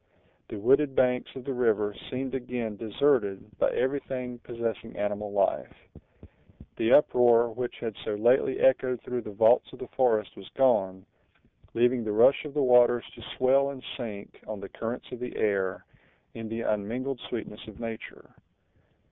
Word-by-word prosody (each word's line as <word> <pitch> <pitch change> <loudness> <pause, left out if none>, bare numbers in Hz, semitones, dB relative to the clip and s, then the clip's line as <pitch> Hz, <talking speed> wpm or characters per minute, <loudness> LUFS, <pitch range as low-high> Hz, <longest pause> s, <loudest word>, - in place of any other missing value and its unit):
The - - -6
wooded 135 +6 +3
banks 125 -1 +2
of 130 - -7
the 135 - -2
river 110 -4 +1 0.2
seemed 130 0 -4
again 125 -4 -4
deserted 105 -3 0
by - - +3
everything 130 -2 -3
possessing 115 -2 -5
animal 105 0 -3
life. 100 -1 0 1.0
The 115 - +1
uproar 120 -4 +5
which 125 +2 -4
had 115 -3 -5
so - - -2
lately 120 +5 +2
echoed 130 -2 +3
through 125 -1 -3
the 110 - -8
vaults 110 +4 +4
of - - -11
the - - -8
forest 110 -6 +1
was 95 - -12
gone, 95 -8 +2 0.7
leaving 120 +1 +2
the 105 -1 -2
rush 135 +7 +5
of 145 -1 -8
the 145 - +2
waters 120 -1 +5
to 120 - -13 0.2
swell 135 +2 +3
and 135 -2 -8
sink 105 -5 -8
on 110 -2 -5
the 100 - -8
currents 115 +2 -6
of 125 - -7
the 125 0 -6
air, 100 -3 -1 0.5
in 115 -1 -7
the 115 +1 -4
unmingled 120 +6 -2
sweetness 110 -2 -6
of 110 - -12
nature. 115 -2 -8
120 Hz, 160 wpm, -27 LUFS, 105-130 Hz, 1.0 s, uproar